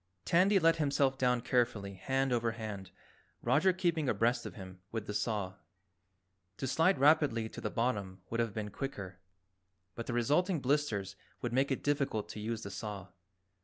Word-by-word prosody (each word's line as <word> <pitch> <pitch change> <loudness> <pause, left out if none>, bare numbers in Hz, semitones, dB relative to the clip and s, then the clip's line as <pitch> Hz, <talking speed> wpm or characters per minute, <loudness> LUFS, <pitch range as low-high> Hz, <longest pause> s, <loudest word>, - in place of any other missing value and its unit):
Tandy 190 +4 +4
let 165 -2 +4
himself 140 -3 +2
down 125 -1 +2
carefully 115 -5 0
hand 130 +7 0
over 115 -1 +1
hand, 105 -4 -6 0.5
Roger 145 +10 +4
keeping 170 -6 0
abreast 115 +3 +1
of - - -9
him 95 -2 -10
with 115 -2 -3
the 105 - -4
saw. 100 -3 -2 1.0
To - - -3
slide 165 +7 +3
rapidly 140 -5 +4
to - - -8
the - - -2
bottom 100 -6 -2
would 115 - -1
have 115 -2 +1
been 105 0 -4
quicker, 100 -9 -6 0.7
but 115 - -6
the 125 - -2
resulting 150 - +2
blisters 125 -9 0 0.3
would 120 -1 -2
make 135 +2 +2
it 135 - -2
difficult 140 -7 0
to - - -7
use 110 +1 -3
the 100 - -6
saw. 100 0 -6
120 Hz, 165 wpm, -33 LUFS, 105-140 Hz, 1.0 s, Tandy